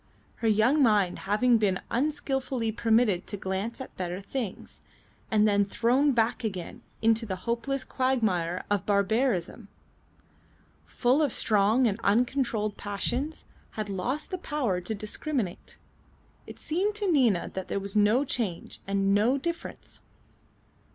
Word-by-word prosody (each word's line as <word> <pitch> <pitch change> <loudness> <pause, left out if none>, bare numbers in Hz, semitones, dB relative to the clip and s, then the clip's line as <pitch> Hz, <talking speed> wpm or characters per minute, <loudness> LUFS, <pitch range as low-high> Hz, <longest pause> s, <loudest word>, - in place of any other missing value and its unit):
Her 230 - -1
young 220 +8 +4
mind 210 -7 +3
having 235 +3 +4
been 195 -3 +1
unskilfully 270 -3 -1
permitted 225 -4 +2
to 205 - -5
glance 190 +5 -3
at 265 - -9
better 180 0 -3
things, 210 0 -6 0.5
and 215 -1 +4
then 205 -1 +3
thrown 245 +8 +2
back 235 0 +1
again 190 -6 -5 0.2
into 225 +1 +3
the 200 -4 -3
hopeless 250 +3 -1
quagmire 215 -10 0
of 205 -3 0
barbarism, 205 0 0 1.2
full 255 +5 +2
of 290 -4 +2
strong 215 +4 +3
and 215 -1 0
uncontrolled 230 -1 +1
passions, 245 +9 -3 0.3
had 215 -1 -4
lost 250 - -3
the 370 - -3
power 255 - -1
to 200 +5 -4
discriminate. 215 - -4 0.7
It - - -10
seemed 385 +7 -1
to 410 -3 0
Nina 240 - +2
that 190 -1 -5
there - - -2
was 200 +1 -7
no 215 +6 +4
change 215 -10 -3
and 195 0 +1
no 225 +7 +3
difference. 335 +4 -6
225 Hz, 135 wpm, -28 LUFS, 200-260 Hz, 1.2 s, young